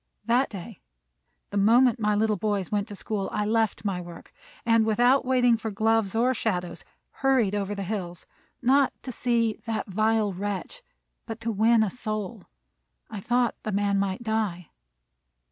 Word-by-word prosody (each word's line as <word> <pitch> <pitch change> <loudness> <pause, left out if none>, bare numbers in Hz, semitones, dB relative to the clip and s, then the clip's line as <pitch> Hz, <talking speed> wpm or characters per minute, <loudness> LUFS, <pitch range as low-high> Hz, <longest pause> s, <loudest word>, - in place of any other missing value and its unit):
That 245 +4 +2
day, 195 +1 -9 0.7
the 205 - -2
moment 235 +4 +4
my 210 -1 +1
little 215 0 +2
boys 200 -1 -2
went 205 0 0
to 205 - -8
school, 200 -1 -3
I 210 - -1
left 220 -1 0
my 190 -3 -1
work, 175 -1 -12 0.3
and, 230 -1 +4
without 245 +5 +3
waiting 245 -2 +3
for 220 0 -4
gloves 220 0 +1
or 245 +3 +3
shadows, 180 -7 -3 0.4
hurried 260 -7 +3
over 205 0 -2
the 200 - -4
hills, 180 -3 -5 0.4
not 270 +2 +4
to 255 - -5
see 230 -3 0
"that 225 -1 -2
vile 215 +1 +1
wretch," 205 - -5 0.5
but 225 -2 -6
to 230 - -1
win 220 +2 +4
a 205 - -1
soul. 215 -4 -5 0.7
I 215 - -5
thought 240 +4 +1
the 215 - -4
man 200 0 +1
might 195 +3 -2
die. 215 -6 -2
215 Hz, 160 wpm, -26 LUFS, 200-235 Hz, 0.7 s, moment